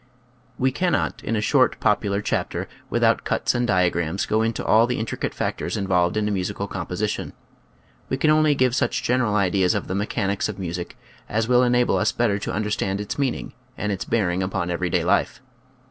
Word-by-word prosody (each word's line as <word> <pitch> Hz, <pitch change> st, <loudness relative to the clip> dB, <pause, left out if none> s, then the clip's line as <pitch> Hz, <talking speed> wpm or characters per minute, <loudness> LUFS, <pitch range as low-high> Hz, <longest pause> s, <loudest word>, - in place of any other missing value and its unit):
We 130 Hz, +1 st, +2 dB
cannot 180 Hz, +6 st, -1 dB
in 115 Hz, -, -1 dB
a 105 Hz, -, 0 dB
short -, -, +3 dB
popular 100 Hz, 0 st, +1 dB
chapter, -, -, -2 dB, 0.2 s
with -, -, 0 dB
out -, -, +3 dB
cuts -, -, 0 dB
and 120 Hz, 0 st, 0 dB
diagrams, 90 Hz, -2 st, +1 dB
go 110 Hz, +1 st, +1 dB
into 115 Hz, 0 st, -1 dB
all 115 Hz, +2 st, +5 dB
the 125 Hz, -, -1 dB
intricate 110 Hz, -, -3 dB
factors -, -, -2 dB
involved 90 Hz, -2 st, +1 dB
in 105 Hz, -1 st, +1 dB
a -, -, 0 dB
musical 95 Hz, -3 st, -2 dB
composition. -, -, -3 dB, 0.8 s
We 130 Hz, -, 0 dB
can 155 Hz, +3 st, +3 dB
only 155 Hz, -1 st, +4 dB
give 130 Hz, -2 st, +2 dB
such -, -, 0 dB
general 120 Hz, -4 st, +1 dB
ideas 95 Hz, -2 st, +2 dB
of -, -, -2 dB
the -, -, -3 dB
mechanics 100 Hz, 0 st, -1 dB
of 105 Hz, -, -5 dB
music 90 Hz, -2 st, -5 dB, 0.3 s
as 110 Hz, +1 st, 0 dB
will 125 Hz, 0 st, +5 dB
enable 125 Hz, -1 st, +3 dB
us 105 Hz, -, +2 dB
better 110 Hz, -4 st, +1 dB
to -, -, -4 dB
understand 105 Hz, -1 st, -1 dB
its 105 Hz, +6 st, -4 dB
meaning 135 Hz, -3 st, -2 dB, 0.2 s
and 105 Hz, -, -2 dB
its 95 Hz, -, -3 dB
bearing 95 Hz, -5 st, 0 dB
upon 95 Hz, -2 st, -2 dB
everyday 90 Hz, 0 st, 0 dB
life. 90 Hz, +4 st, +1 dB
105 Hz, 190 wpm, -23 LUFS, 95-120 Hz, 0.8 s, all